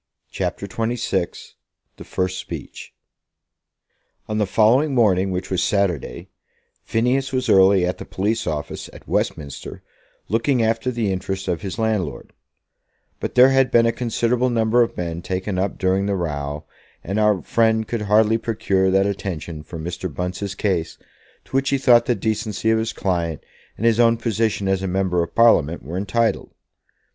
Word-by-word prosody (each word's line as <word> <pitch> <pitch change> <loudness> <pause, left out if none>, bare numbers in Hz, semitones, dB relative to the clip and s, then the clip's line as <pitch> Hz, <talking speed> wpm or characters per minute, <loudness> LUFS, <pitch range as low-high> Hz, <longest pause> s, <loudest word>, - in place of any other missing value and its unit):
CHAPTER - - -3
XXVI 115 +4 -3 0.5
"The - - -9
First 95 0 -2
Speech" - - -8 1.3
On 105 0 -2
the 105 - +1
following 125 +9 +3
morning, 100 -5 +3
which 95 0 -4
was 95 -1 +1
Saturday, 95 -8 -1 0.5
Phineas 130 +4 0
was 130 -1 -1
early 95 -3 +5
at 90 - -3
the - - -7
police 110 +4 -2
office 75 -2 -4
at - - -14
Westminster 70 -3 -3 0.4
looking 115 +4 +1
after 115 +2 0
the 115 -5 -1
interests 95 +1 -3
of 85 -3 -1
his 95 -1 -5
landlord; 110 -9 -2 0.9
but - - -4
there 125 +1 +8
had 135 -1 +3
been 115 -1 +4
a 115 - +3
considerable 120 +1 0
number 115 0 +2
of 115 - 0
men 85 -1 -3
taken 95 +1 -3
up 95 +1 -1
during 95 +1 +1
the 100 - 0
row, 75 -3 -4 0.4
and 100 +5 -2
our 105 -4 +2
friend 110 -1 +2
could 115 -2 -3
hardly 105 +2 +3
procure 95 -4 0
that 95 +1 +3
attention 85 -5 -4
for 80 - -9
Mr. 85 +2 -5
Bunce's 90 +4 -4
case 95 -6 -1 0.5
to - - -24
which 135 0 +2
he 140 - +2
thought 120 -3 +4
the 120 - +2
decency 110 +1 -1
of 110 - +2
his 110 0 -2
client 85 -5 -2 0.3
and 110 - -3
his 115 0 +3
own 115 -1 +5
position 110 -3 -1
as 95 -1 +1
a 95 - -2
member 90 -1 0
of 85 - -5
Parliament 85 -9 +4
were 80 +6 -6
entitled. 105 +4 0
100 Hz, 165 wpm, -21 LUFS, 95-115 Hz, 1.3 s, there